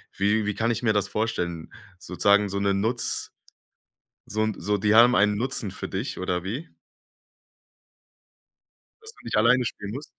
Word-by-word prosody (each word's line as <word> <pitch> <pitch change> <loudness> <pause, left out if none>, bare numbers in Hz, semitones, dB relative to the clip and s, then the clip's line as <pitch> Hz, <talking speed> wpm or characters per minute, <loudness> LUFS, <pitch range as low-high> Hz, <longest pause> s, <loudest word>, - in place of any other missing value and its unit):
wie 105 +2 +1
wie 105 - -1
kann 115 +1 0
ich 115 - -3
mir 110 -3 +3
das 100 -2 0
vorstellen? 85 -7 -3 0.3
Sozusagen 100 +3 +2
so 100 +1 -3
'ne 100 0 +1
Nutz 110 +5 -1 1.0
so 110 +1 -2
'n 110 -1 0
so 105 +4 0
die 105 +2 +2
haben 120 +2 +7
einen 105 0 +3
Nutzen 120 -3 -2
für - - -7
dich 100 +8 -4
oder 90 -1 -2
wie? 125 +12 -6 2.3
Dass 445 0 -12
du 425 - -20
nicht - - -3
alleine 120 +4 +4
spielen 100 -3 -5
musst? 135 +7 -6
105 Hz, 165 wpm, -25 LUFS, 100-115 Hz, 2.3 s, haben